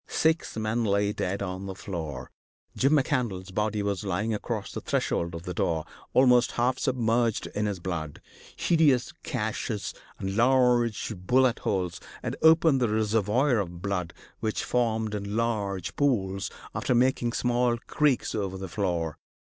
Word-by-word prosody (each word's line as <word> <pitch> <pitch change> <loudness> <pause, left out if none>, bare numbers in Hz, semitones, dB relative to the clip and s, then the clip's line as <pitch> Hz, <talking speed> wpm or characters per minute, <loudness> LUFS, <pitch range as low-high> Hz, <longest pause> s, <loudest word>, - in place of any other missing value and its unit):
Six 160 -6 +1
men 110 +2 0
lay 100 -1 +1
dead 100 +1 -2
on 95 0 -4
the 95 - -5
floor. 80 -10 -6 0.4
Jim 135 +3 +3
McCandlas' 120 - 0
body 105 +1 0
was 100 0 -1
lying 100 +3 -1
across 105 - -3
the - - -5
threshold 85 0 -1
of 85 - -7
the 90 -1 -4
door, 80 -2 0 0.3
almost 125 -1 +5
half 125 +2 +1
submerged 120 -3 +1
in 105 0 0
his 100 -3 -3
blood. 80 -4 -4 0.4
Hideous 150 -7 +3
gashes - - -3 0.2
and 95 0 -3
large 120 -2 +3
bullet 125 +7 +2
holes 90 -3 -2 0.2
had - - -2
opened 160 -4 +5
the 120 - +2
reservoir 110 +4 +2
of 90 -2 -5
blood 90 -4 -2 0.3
which 110 -1 -1
formed 110 -3 0
in 100 0 -3
large 105 -6 -1
pools, 100 -9 0 0.2
after 125 - 0
making 120 -1 +2
small 120 -1 +1
creeks 150 -4 +1
over 95 -3 -2
the 95 0 -5
floor. 85 -3 -2
105 Hz, 150 wpm, -27 LUFS, 95-125 Hz, 0.4 s, almost